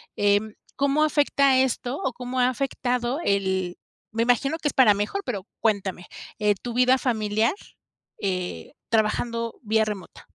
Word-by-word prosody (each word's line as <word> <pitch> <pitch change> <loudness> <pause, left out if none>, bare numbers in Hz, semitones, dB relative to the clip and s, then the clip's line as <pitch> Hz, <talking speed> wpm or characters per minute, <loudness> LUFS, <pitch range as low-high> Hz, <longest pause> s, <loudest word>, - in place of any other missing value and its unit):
em, 205 +1 +2 0.2
¿cómo 280 +2 +2
afecta 280 -3 +3
esto 260 0 0
o 265 - -1
cómo 250 +1 -4
ha 250 - +4
afectado 250 0 -1
el 190 -2 0 0.3
me 225 +1 0
imagino 260 +6 +2
que 295 - 0
es - - -6
para 240 -6 +6
mejor, 210 - -2
pero 205 -6 -4
cuéntame, 195 -5 -1 0.3
eh, 210 -1 +3
tu 235 +4 -7
vida 255 +1 +4
familiar, 220 - +1 0.7
eh, 180 - -3 0.2
trabajando 230 +1 0
vía 220 -1 +2
remota? 210 -4 -6
230 Hz, 145 wpm, -25 LUFS, 205-255 Hz, 0.7 s, para